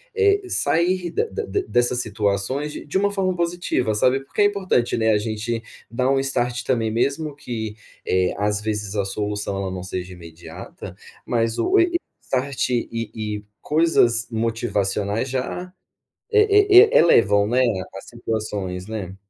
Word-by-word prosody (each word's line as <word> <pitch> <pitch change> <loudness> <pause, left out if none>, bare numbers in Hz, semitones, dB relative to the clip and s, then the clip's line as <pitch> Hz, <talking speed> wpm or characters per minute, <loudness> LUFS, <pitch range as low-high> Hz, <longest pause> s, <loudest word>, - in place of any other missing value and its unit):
eh, 405 -2 +3
sair 175 - +1
de 460 - -1
de 415 -2 -2
dessas 120 0 +1
situações 110 +7 -1
de - - -8
de 150 - 0
uma 200 +1 +1
forma 190 -2 0
positiva, 170 -9 -1
sabe? 125 +5 +3
Porque - - -2
é - - +6
importante, 190 -14 +1
né, 110 -1 +2
a 105 - +4
gente 110 +2 -3 0.3
dar 125 +2 0
um 135 0 +3
start 125 -3 -1
também, 115 -4 0
mesmo 140 +6 -1
que, 110 -6 -5 0.3
eh, 90 0 +1
às 105 +1 0
vezes, 105 -2 -3
a 100 -2 0
solução 105 0 -3
ela 95 - -3
não 90 -1 -5
seja 90 0 -5
imediata, 85 -1 -10 0.3
mas 115 -1 -1
o 375 +2 +2
e 345 - +6
e - - +3 0.2
start 135 +1 -2
e 120 -1 0
e 110 -2 -4 0.2
coisas 145 -7 +2
motivacionais 110 -1 -1
já 135 +8 -4 0.6
e 410 -3 +6
e - - +5
elevam, 105 - +5
né, 125 +4 +2 0.3
as 95 - -9
situações, 105 -5 -4
né? 100 -4 -5
115 Hz, 155 wpm, -22 LUFS, 105-150 Hz, 0.6 s, é